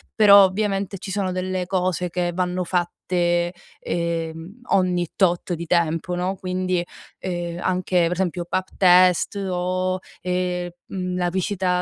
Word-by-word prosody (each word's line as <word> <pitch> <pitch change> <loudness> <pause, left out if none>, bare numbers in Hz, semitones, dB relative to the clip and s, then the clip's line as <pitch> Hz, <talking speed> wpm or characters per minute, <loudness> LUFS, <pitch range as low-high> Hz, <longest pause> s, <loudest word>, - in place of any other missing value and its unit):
però 200 -2 +8
ovviamente 195 0 0
ci 190 - -7
sono 190 -1 -1
delle 185 0 -2
cose 180 -1 0
che 175 0 -1
vanno 180 0 -1
fatte, 175 0 0 0.3
ehm, 170 +4 -4
ogni 180 -2 +2
tot 175 -1 +1
di 170 0 -4
tempo, 165 +1 +1
no, 180 +2 -1
quindi, 185 -1 -1 0.4
ehm, 175 -2 -4
anche 185 0 0
per 170 - +2
esempio 180 -1 -2
pap 185 +2 -2
test 180 0 +5
o, 185 +1 -1 0.2
ehm, 180 -1 -2 0.2
mhmm, 180 -1 -3
la 180 -1 0
visita 190 +1 -1
180 Hz, 135 wpm, -23 LUFS, 175-185 Hz, 0.4 s, però